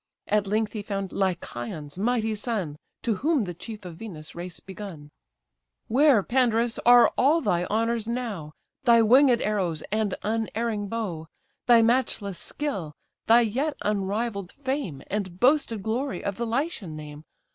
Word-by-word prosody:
At 210 -1 +1
length 215 +1 0
he 215 - -3
found 195 -2 -4
Lycaon's 155 -4 -3
mighty 225 0 +1
son; 205 - -3 0.3
To 225 -4 0
whom 295 - +2
the 180 -3 -4
chief 210 +3 -9
of 170 -2 -8
Venus' 165 -8 -8
race 175 0 -6
begun: 185 -7 -9 0.8
"Where, 260 -3 +5
Pandarus, 235 -1 +1
are 245 0 +7
all 295 +6 +5
thy 175 - +1
honours 225 +1 0
now, 225 -11 -3 0.3
Thy 235 -3 +6
winged 250 +2 +6
arrows 185 -7 -1
and 215 -2 0
unerring 220 -1 -1
bow, 195 -8 -4 0.4
Thy 235 -2 +7
matchless 225 -5 +1
skill, 195 - -4 0.3
thy 230 +2 +7
yet 270 +7 -1
unrivall'd 200 -1 -1
fame, 265 - -4
And 185 -3 -4
boasted 245 -5 +3
glory 250 +6 -2
of 200 -1 -3
the 235 - -2
Lycian 230 - -2
name? 150 0 -9
215 Hz, 145 wpm, -26 LUFS, 185-235 Hz, 0.8 s, are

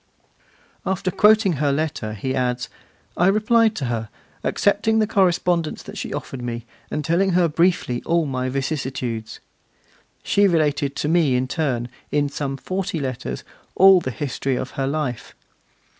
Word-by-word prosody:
After 185 -1 -1
quoting 210 0 +5
her 145 0 +1
letter, 140 -7 -2
he 130 +6 -3
adds: 125 -1 -1 0.5
'I 175 - +4
replied 215 +2 +3
to 140 - -3
her, 115 -2 -3 0.3
accepting 205 +2 +2
the 220 - +4
correspondence 180 -5 +1
that - - -10
she - - -5
offered 130 - -5
me, 120 -1 -4 0.2
and 150 -1 -3
telling 180 +4 +2
her 175 -1 +4
briefly 165 -6 +1
all 170 -1 +1
my 130 -2 -2
vicissitudes. 130 -5 -3 0.8
She 200 0 +3
related 150 -5 +1
to - - -2
me 160 -5 +3
in 125 +1 0
turn, 130 -5 -1 0.2
in 145 0 +1
some 140 -1 -3
forty 185 0 -3
letters, 130 - -4 0.3
all 190 -1 +7
the 130 - -3
history 135 +1 -2
of 130 - -4
her 135 -1 -2
life. 140 -5 -3
150 Hz, 150 wpm, -22 LUFS, 130-180 Hz, 0.8 s, all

